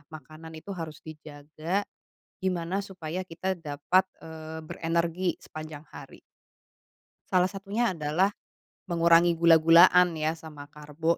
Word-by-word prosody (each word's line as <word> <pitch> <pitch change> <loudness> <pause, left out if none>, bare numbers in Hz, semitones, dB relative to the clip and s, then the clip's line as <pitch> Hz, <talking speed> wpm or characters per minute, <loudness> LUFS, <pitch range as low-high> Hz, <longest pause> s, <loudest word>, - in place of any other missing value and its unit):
makanan 160 +1 -11
itu 180 +6 -8
harus 160 -4 -8
dijaga, 155 +4 -5 0.6
gimana 185 0 -1
supaya 185 -3 -6
kita 185 +1 -3
dapat, 170 +3 0 0.2
eee, 160 0 -8
berenergi 170 +2 -1
sepanjang 155 -1 -10
hari. - - -12 1.1
Salah 185 -1 +4
satunya 195 +2 -2
adalah, 155 +4 +1 0.6
mengurangi 170 -1 +4
gula-gulaan 170 +2 +6
ya, 155 +1 -2
sama 150 -3 -11
karbo 150 +3 -2
165 Hz, 105 wpm, -27 LUFS, 155-180 Hz, 1.1 s, gula-gulaan